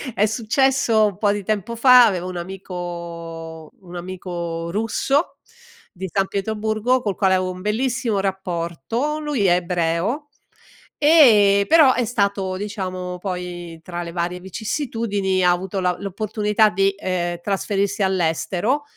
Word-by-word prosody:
è 210 - +3
successo 230 0 +2
un 195 - -5
po' 205 -2 +2
di 205 -1 -3
tempo 215 +2 -2
fa, 250 0 +7
avevo 185 -4 -1
un 180 - -6
amico 170 -3 -7
un 180 -1 -12
amico 175 -2 -5
russo, 225 - 0 0.5
di 190 0 -6
San 195 -1 +1
Pietroburgo 220 +4 -1
col 205 -4 -2
quale 190 -2 +2
avevo 185 0 -1
un 180 0 -9
bellissimo 230 +1 -1
rapporto, 190 - -2
lui 295 -9 -1
è 175 - +5
ebreo, 180 - -1 0.7
e 215 -11 +6
però 305 -5 +6
è 245 - 0
stato 200 -4 -1
diciamo 185 -3 -5
poi, 175 -3 -6
tra 175 -1 -5
le 170 - -7
varie 175 +1 -3
vicissitudini, 205 - -2
ha 180 - +5
avuto 190 +2 -2
la 180 -1 +1
l'opportunità 210 +2 +1
di, 195 +1 +1
ehm, 175 -3 -2
trasferirsi 200 +1 -1
all'estero 190 - 0
195 Hz, 135 wpm, -21 LUFS, 180-220 Hz, 0.7 s, fa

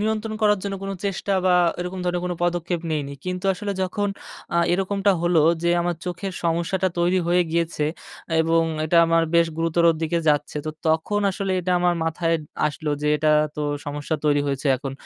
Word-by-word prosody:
নিয়ন্ত্রণ 220 +1 -1
করার 210 -1 +4
জন্য 200 -1 -3
কোনো 195 0 -3
চেষ্টা 195 0 -2
বা 180 - +5 0.3
এরকম 180 +1 -4
ধরনের 175 0 -1
কোনো 180 - -2
পদক্ষেপ 175 -1 -1
নিইনি, 145 -2 -2
কিন্তু 180 +1 -4
আসলে 200 +2 -4
যখন 205 +2 -1 0.5
আ - - +3 0.2
এরকমটা 195 +2 +1
হলো 175 -2 +3 0.2
যে, 170 - +2
আমার 175 -1 -1
চোখের 180 +2 -4
সমস্যাটা 170 +3 +1
তৈরি 175 +2 +2
হয়ে 180 +1 +4
গিয়েছে 165 -2 0 0.6
এবং 165 +1 +3 0.2
এটা 165 +2 +1
আমার 165 0 +3
বেশ 170 0 +5
গুরুতর 165 +1 +1 0.2
দিকে 170 +1 0
যাচ্ছে, 150 0 +1
তো - - -1 0.2
তখন 160 +6 +1
আসলে 190 0 -2
এটা 180 +1 -1
আমার 175 -1 +3
মাথায় 165 +1 0 0.3
আসলো 150 0 -3
যে, - - 0
এটা 155 +1 +2 0.3
তো - - -3 0.3
সমস্যা 145 +2 -3
তৈরি 145 -1 +3
হয়েছে, 140 +1 -2
এখন 135 0 -6
175 Hz, 180 wpm, -23 LUFS, 160-190 Hz, 0.6 s, বা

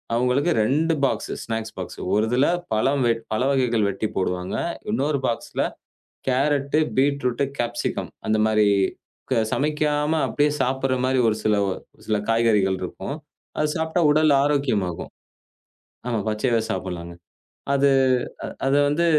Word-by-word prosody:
அவங்களுக்கு 125 +7 +2
2 155 +8 +2
box, 115 -5 -1
snacks 110 -1 -4
box 90 -2 -6
ஒரு 105 - +3
இதுல 125 +4 +3 0.3
பழ 110 +4 +2 0.6
வகைகள் 120 -5 +2
வெட்டிப் 100 +2 -3
போடுவாங்க. 90 -1 -1 0.4
இன்னொரு 145 -8 0
பாக்ஸ்ல 115 - -2 0.7
கேரட், 140 +2 +1 0.2
பீட்ரூட், 140 -2 +1
காப்சிகம் 120 0 -2 0.2
அந்த 110 - +2
மாரி 110 -1 +3 0.7
க 125 - +3
சமைக்காம 150 +1 +1
அப்படியே 150 0 +1
சாப்பிடுற 130 +1 0
மாரி 130 0 +1
ஒரு 110 - +1
சில 105 -1 +3
ஒரு 95 - -3 0.3
சில 110 -1 +2
காய்கறிகள் 105 -5 +2
இருக்கும். 115 +9 -5 0.4
அதை 150 - +2
சாப்பிட்டா 160 +2 0
உடல் 155 0 +4
ஆரோக்கியமாகும். 125 - 0 1.0
ஆமா, 115 -3 0
பச்சையாவே 115 +2 +1
சாப்பிடலாங்க. 90 -2 -5 0.6
அதை 140 0 +4 0.8
அதை 135 +1 +3
வந்து, 160 +4 +1
125 Hz, 120 wpm, -23 LUFS, 110-145 Hz, 1.0 s, உடல்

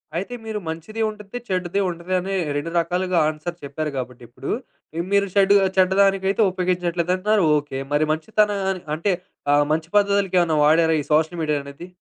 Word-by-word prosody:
అయితే 195 +8 -3
మీరు 220 -1 -4
మంచిదీ 165 +8 -5
ఉండిద్ది, 210 +2 -8
చెడ్డదీ 185 0 -1
ఉంటది 170 +1 -5
అనే 195 +2 -3 0.2
2 145 +3 -4
రకాలుగా 180 +2 -1
ఆన్సర్ 155 +3 -5
చెప్పారు 150 +2 -4
కాబట్టిప్పుడు. 125 -2 -7 0.5
ఆ - - +1
మీరు 200 0 +3
షెడ్ 200 0 +5 0.2
చెడ్డదానికైతే 195 +2 +3
ఉపయోగించట్లేదంటున్నారు 180 +2 0
ఓకే. 145 -2 -4
మరి 150 +1 +3
మంచితన 210 +6 +1 0.4
అంటే 185 +5 0 0.4
ఆహ్, 145 0 +4
మంచి 160 +1 -2
పద్ధతులకి 200 -2 +2
ఏవన్నా 165 -2 +1
వాడారా 160 +1 +4
ఈ - - -7
సోషల్ 160 +3 +1
మీడియా 150 -2 0
అనేది? 140 +5 -10
175 Hz, 150 wpm, -22 LUFS, 155-195 Hz, 0.5 s, షెడ్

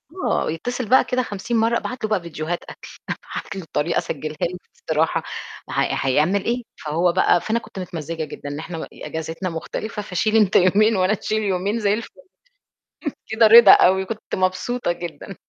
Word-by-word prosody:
آه، 370 - 0
يتصل 240 +7 -4
بقى 260 - +6
كده 255 0 -1
50 215 +3 -3
مرّة، 230 +1 +3
أبعت 250 -3 -6
له 215 - -1
بقى 205 -4 +1
فيديوهات 170 0 -4
أكل، - - -11 0.2
أبعت - - -6
له 190 - -4
الطريقة 160 0 -1
أسجّلها 155 0 -3
له 180 +1 -1 0.3
بصراحة 160 +1 +1 0.5
هي - - +1
هيعمل 155 +9 +2
إيه، 240 +1 0 0.2
فهو 170 +4 +2
بقى 175 -1 +3
فأنا 225 +2 0
كنت 195 - -10
متمزّجة 165 -2 -5
جدًا 145 0 -7
إحنا 165 +1 -6
م - - -5
إجازتنا 160 +3 -5
مختلفة 210 +6 -5
فشيل 210 +2 -1
أنت 210 -4 +4
يومين 205 +4 +5
وأنا 185 +2 +2
أشيل 215 +1 -1
يومين 200 +3 0
زَي 205 -1 +2
الفل. 225 +1 -4 1.2
كده 220 0 +4
رضا 230 +2 +10
أوي 190 +1 +5
كنت 220 +2 -5
مبسوطة 185 +4 0
جدًا. 175 +3 -7
190 Hz, 170 wpm, -22 LUFS, 165-220 Hz, 1.2 s, رضا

